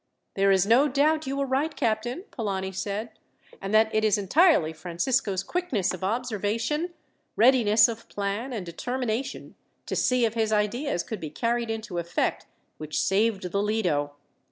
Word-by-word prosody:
"There 195 0 +2
is 190 -1 +4
no 240 +7 +5
doubt 300 +2 +1
you 275 +1 -2
were 280 - 0
right, 275 +4 -1
captain," 235 - -1
Polani 195 -5 -3
said, 200 +4 -4 0.5
"and 195 - -4
that 220 0 +4
it 215 - +2
is 215 -2 +3
entirely 205 - +3
Francisco's 185 +5 -1
quickness 245 - -1
of 185 - -7
observation, 230 - -1 0.4
readiness 225 -3 +5
of 230 -1 -7
plan, 205 +6 -3
and 215 -7 -4
determination 250 +7 -4 0.3
to - - -3
see 250 -2 +2
if 220 - -1
his 220 -2 0
ideas 215 - 0
could 220 - -6
be 155 - -5
carried 235 +7 -1
into 220 -5 -4
effect, 170 +1 -2 0.3
which 155 0 -3
saved 195 -2 +1
the 200 - 0
Lido. 175 -10 0
220 Hz, 155 wpm, -26 LUFS, 195-250 Hz, 0.5 s, no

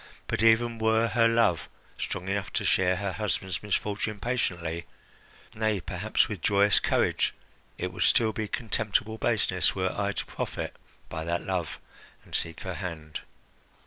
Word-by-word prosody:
"But - - -1
even 115 +1 +4
were 110 +1 +3
her 115 -1 +4
love 115 -8 +2 0.3
strong 90 - -4
enough 100 +1 -1
to 105 - 0
share 95 -1 +3
her 100 +1 -2
husband's 95 -2 -2
misfortune 105 +1 -1
patiently 85 -8 -2 0.7
nay, 110 -2 +1
perhaps 85 - +1
with - - -5
joyous 100 0 +4
courage - - +1 0.4
it - - -3
would - - -6
still 110 -2 +4
be 110 0 -2
contemptible 110 -1 -1
baseness 100 -8 +2
were 95 -1 0
I 100 0 0
to - - -3
profit - - -4 0.3
by 80 -1 -4
that 85 +1 -1
love 90 -4 -2 0.5
and - - -16
seek 85 0 -2
her 95 - -4
hand." 80 -4 -5
100 Hz, 150 wpm, -28 LUFS, 90-110 Hz, 0.7 s, even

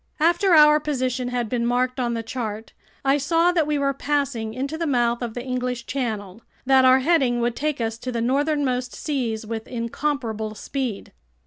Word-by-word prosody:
After 345 +3 +4
our 300 0 +7
position 255 -4 -2
had 245 -2 -2
been 235 +1 -1
marked 250 +2 0
on 240 -2 0
the 230 - -3
chart, 225 -2 -5 0.3
I 275 +2 +3
saw 330 +5 +3
that 330 -4 +1
we 300 -1 +1
were 275 -1 +1
passing 275 -6 -2
into 275 +4 -3
the 330 0 -2
mouth 240 -3 +1
of 235 -2 -4
the 245 - -4
English 250 -2 -3
Channel, 220 -6 -4 0.2
that 265 0 +5
our 260 +1 +6
heading 265 -5 +2
would 235 0 0
take 300 -1 -2
us 225 -1 -2
to 255 - -4
the 235 - -2
northernmost 260 0 0
seas 235 -7 -2
with 220 0 -5
incomparable 230 -3 -3
speed. 255 -3 -4
255 Hz, 185 wpm, -23 LUFS, 235-285 Hz, 0.3 s, our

